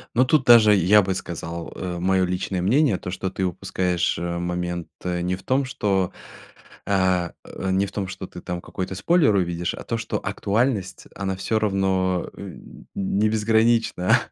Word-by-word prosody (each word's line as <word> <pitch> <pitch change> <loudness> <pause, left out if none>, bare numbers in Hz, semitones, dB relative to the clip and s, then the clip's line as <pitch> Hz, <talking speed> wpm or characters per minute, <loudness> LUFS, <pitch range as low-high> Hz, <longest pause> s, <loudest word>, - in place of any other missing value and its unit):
Ну, 130 - +5
тут 140 +1 +3
даже 115 -4 +7
я 100 +2 +5
бы 95 - -1
сказал, 85 -2 -6
э, 90 -2 -4
моё 95 +1 +2
личное 90 0 -2
мнение, 125 +1 +3
то, 90 - -6
что 95 0 -3
ты 95 +1 -2
упускаешь, 90 0 -1
э, 85 0 -3
момент 90 -1 -3 0.2
не 90 0 -1
в 95 - -14
том, 135 +1 +1
что, 95 -7 0 0.7
а, 95 -3 +1
э, 95 - -5
не 95 +1 +2
в 100 - -9
том 100 -2 -3
ты 95 -1 -8
там 90 0 -4
какой-то 95 0 -5
спойлер 145 - +3
увидишь, 85 -2 -1
а - - -8
то, 115 - -2
что 115 -1 -3
актуальность, 105 -2 -1
она 95 -1 -3
всё 110 +3 0
равно, 95 -3 0
э, - - -9 0.4
не 100 +2 0
безгранична, 110 -2 +3
95 Hz, 170 wpm, -23 LUFS, 90-105 Hz, 0.7 s, даже